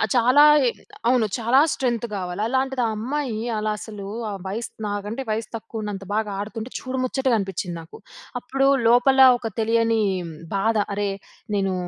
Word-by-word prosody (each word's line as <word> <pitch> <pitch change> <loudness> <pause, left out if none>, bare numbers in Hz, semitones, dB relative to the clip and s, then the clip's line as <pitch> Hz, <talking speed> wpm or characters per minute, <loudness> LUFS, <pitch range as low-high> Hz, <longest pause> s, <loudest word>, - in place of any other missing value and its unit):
చాలా 250 +4 +6 0.6
అవును. 245 -2 +4
చాలా 240 +3 +3
స్ట్రెంగ్త్ 240 -3 -1
కావాలి. 180 0 -4
అలాంటిది, 265 +1 0
ఆ - - +1
అమ్మాయి 250 0 -2 0.2
అలా 215 0 -1
అసలు, 210 -2 -8 0.2
ఆ - - -4 0.2
వయసు 220 +5 -4 0.2
నాకంటే 205 +4 -4
వయసు 215 0 -2
తక్కువ 225 0 -6
ఉన్నంత 200 -2 -5
బాగా 215 -1 -1
ఆడుతుంటే, 220 +3 -5
చూడు 260 0 -5
ముచ్చటగా 260 -1 +1
అనిపించింది 190 -2 -4
నాకు. 160 - -13 0.4
అప్పుడు 270 +2 0 0.2
లోపల 245 +3 +4 0.2
ఒక 230 -2 -4
తెలియని 225 0 +2 0.5
బాధ. 220 +3 +1 0.2
అరే 205 0 -1 0.5
నేను 195 -1 0
225 Hz, 145 wpm, -23 LUFS, 205-250 Hz, 0.6 s, చాలా